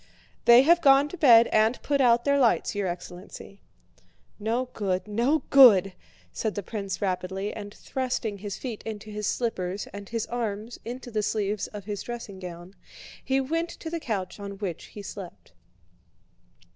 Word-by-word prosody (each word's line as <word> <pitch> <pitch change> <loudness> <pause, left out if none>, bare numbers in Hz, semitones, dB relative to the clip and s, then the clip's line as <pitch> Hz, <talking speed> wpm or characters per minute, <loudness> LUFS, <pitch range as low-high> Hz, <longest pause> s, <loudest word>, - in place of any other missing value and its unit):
"They 240 +2 +8
have 340 +4 +5
gone 275 0 +5
to - - -7
bed 235 -7 +7
and 220 +3 +3
put 280 -1 +1
out 240 -1 +4
their 280 0 +3
lights, 240 -4 +2
your 205 -2 -1
excellency." 180 +3 -8 0.8
"No 230 +4 -1
good... 190 -2 -2
no 240 +9 +1
good..." 205 -9 +7 0.4
said 220 -2 -2
the 205 - -3
prince 200 -1 -4
rapidly, 190 +1 -2
and 205 0 -7
thrusting 245 -4 -3
his 205 0 -5
feet 240 -5 -6
into 215 -1 -7
his 210 0 -3
slippers 195 -5 -2
and 200 0 -8
his 230 -1 -2
arms 225 -1 -4
into 245 +1 -7
the 215 -1 0
sleeves 210 -1 -1
of 205 -2 -9
his 205 -2 -4
dressing 230 -5 -7
gown, 175 0 -9 0.5
he 265 0 +1
went 330 +5 -1
to 320 - -8
the 335 - -2
couch 205 - -4
on 200 0 -6
which 190 -5 -5
he 205 - -10
slept. 180 - -9
215 Hz, 165 wpm, -26 LUFS, 200-245 Hz, 0.8 s, They